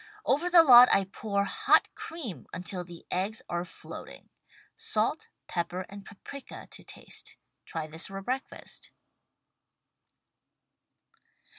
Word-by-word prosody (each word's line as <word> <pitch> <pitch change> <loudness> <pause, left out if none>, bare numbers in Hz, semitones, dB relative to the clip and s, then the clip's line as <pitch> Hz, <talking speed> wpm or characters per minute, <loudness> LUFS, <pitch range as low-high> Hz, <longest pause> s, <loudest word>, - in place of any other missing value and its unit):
Over 310 +7 +2
the 345 -2 +8
lot, 250 -4 +10
I 195 - +6
pour 200 +1 -1
hot - - +3
cream 240 - -7
until 180 +1 -4
the 175 -1 -12
eggs 200 +5 -1
are 175 0 -1
floating. 180 - -10 0.5
Salt, - - -1 0.2
pepper 175 +1 -3
and 200 0 -9
paprika 255 +7 -10
to - - -8
taste. - - -8 0.3
Try 160 -2 -4
this 160 +3 -4
for 195 0 -6
breakfast. 260 +6 -5
195 Hz, 115 wpm, -29 LUFS, 180-250 Hz, 0.5 s, lot